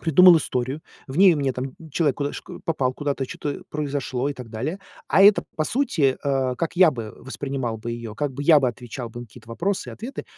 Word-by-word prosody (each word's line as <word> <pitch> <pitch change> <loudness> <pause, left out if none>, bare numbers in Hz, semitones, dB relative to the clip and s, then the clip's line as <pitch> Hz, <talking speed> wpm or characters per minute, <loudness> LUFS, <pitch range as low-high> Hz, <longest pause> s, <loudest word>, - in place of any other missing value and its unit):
придумал 175 +2 +7
историю, 130 0 -3 0.3
в 130 - -7
ней 185 -3 +7
мне 140 -2 0
там 130 +1 -5 0.2
человек 150 -6 +1
куда 145 0 -2
шк - - -9
попал 135 -6 0
куда-то, 140 -1 -2
чё-то 145 +2 -5
произошло, 140 -3 -2
и - - -2
так 125 -3 -9
далее, 145 - -4 0.3
а 195 - +4
это, 205 +1 +7
по 155 - 0
сути, 175 - +1
э, 135 -3 0
как 165 - -2
я 180 -2 +6
бы 115 -6 -6
воспринимал 130 -3 -4
бы 115 +2 -5
ее, 115 -2 -7
как 145 +1 -2
бы 140 +3 -5
я 155 0 +7
бы 135 - +1
отвечал 120 0 -5
бы 120 +2 -9
на 120 - -8
какие-то 110 - -16
вопросы 185 +12 -2
и - - -8
ответы, 245 +5 -7
140 Hz, 220 wpm, -23 LUFS, 125-160 Hz, 0.3 s, придумал